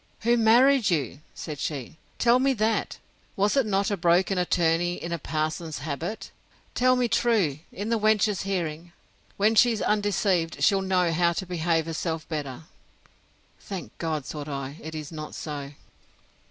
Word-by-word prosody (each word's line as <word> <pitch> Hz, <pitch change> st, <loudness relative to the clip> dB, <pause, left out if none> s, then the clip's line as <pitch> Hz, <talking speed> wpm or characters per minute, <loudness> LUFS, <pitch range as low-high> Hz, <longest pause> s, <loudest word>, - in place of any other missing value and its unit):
Who 235 Hz, +2 st, +3 dB
married 240 Hz, +2 st, +5 dB
you? 140 Hz, -6 st, -1 dB, 0.2 s
said 150 Hz, -4 st, -6 dB
she: 145 Hz, 0 st, -5 dB, 0.2 s
tell 240 Hz, +1 st, +4 dB
me 270 Hz, +1 st, +3 dB
that! 220 Hz, -2 st, 0 dB, 0.4 s
Was 205 Hz, +4 st, +2 dB
it 270 Hz, -5 st, +2 dB
not 200 Hz, 0 st, +1 dB
a -, -, +2 dB
broken 180 Hz, +2 st, +2 dB
attorney 175 Hz, 0 st, +1 dB
in 170 Hz, -, -6 dB
a 170 Hz, -, -2 dB
parson's 155 Hz, +1 st, -3 dB
habit? 160 Hz, +8 st, -5 dB, 0.4 s
Tell 255 Hz, +1 st, +3 dB
me 250 Hz, -1 st, +1 dB
truly, 200 Hz, -, +1 dB
in 205 Hz, +3 st, -5 dB
the 230 Hz, -1 st, +1 dB
wench's 210 Hz, -2 st, +2 dB
hearing. 170 Hz, -3 st, -3 dB, 0.4 s
When 210 Hz, +2 st, +3 dB
she's 225 Hz, 0 st, +4 dB
undeceived, 195 Hz, -5 st, 0 dB
she'll 195 Hz, -2 st, +4 dB
know 185 Hz, -2 st, +1 dB
how 170 Hz, +1 st, +2 dB
to 190 Hz, -, -3 dB
behave 165 Hz, -2 st, 0 dB
herself 165 Hz, 0 st, -3 dB
better! 145 Hz, -3 st, -5 dB, 1.0 s
Thank 195 Hz, -3 st, -7 dB
God, 155 Hz, -4 st, -2 dB
thought 150 Hz, -1 st, -6 dB
I, 140 Hz, +1 st, -5 dB
it 160 Hz, +1 st, -7 dB
is 155 Hz, -1 st, -6 dB
not 155 Hz, -1 st, -7 dB
so. 145 Hz, -2 st, -6 dB
175 Hz, 155 wpm, -26 LUFS, 155-210 Hz, 1.0 s, married